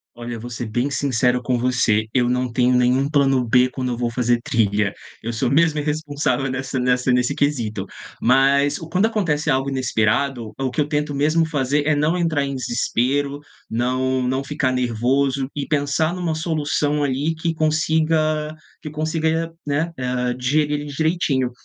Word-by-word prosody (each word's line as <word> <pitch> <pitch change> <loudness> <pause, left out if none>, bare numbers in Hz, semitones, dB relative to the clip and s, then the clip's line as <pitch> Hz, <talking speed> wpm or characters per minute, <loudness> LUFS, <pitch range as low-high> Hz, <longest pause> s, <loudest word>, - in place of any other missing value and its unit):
Olha, 120 0 -6
vou 120 +2 -7
ser 120 0 -5
bem 120 +5 -1
sincero 125 -3 +1
com 125 -1 0
você, 120 -3 +2
eu 125 -1 +2
não 125 0 0
tenho 125 +1 +2
nenhum 125 +2 +3
plano 135 -4 +2
b 125 +2 +4
quando 130 -1 -3
eu 120 - -3
vou 120 0 -1
fazer 120 0 +1
trilha, 105 -4 +1 0.3
eu 115 - -3
sou 120 +2 -1
mesmo 155 +1 +3
irresponsável 145 -2 -1
nessa 130 0 -3
nessa 125 +1 +1
nesse 125 0 +1
quesito. 115 -9 -1 0.3
Mas 140 +3 +3
o 165 - -9
quando 185 +5 +2
acontece 170 -10 0
algo 135 +1 +1
inesperado, 120 -1 0
o 135 -1 -1
que 150 - 0
eu 145 - 0
tento 150 -1 -1
mesmo 155 +4 +2
fazer 145 -2 0
é 155 0 +3
não 155 +4 +1
entrar 165 -5 +1
em 140 0 -3
desespero, 135 +3 -1 0.3
não 130 +2 0
não 130 +2 -1
ficar 135 -2 -1
nervoso 130 +2 0
e 145 -1 -3
pensar 155 +3 0
numa 175 -3 -2
solução 150 -2 0
ali 145 +4 0
que 165 +1 -2
consiga 155 0 +1 0.3
que 150 - -6
consiga, 160 +2 -1 0.2
né, 150 +4 0
eh, 125 -1 -1
digerir 145 +4 0
direitinho. 145 -4 0
135 Hz, 165 wpm, -21 LUFS, 125-150 Hz, 0.3 s, b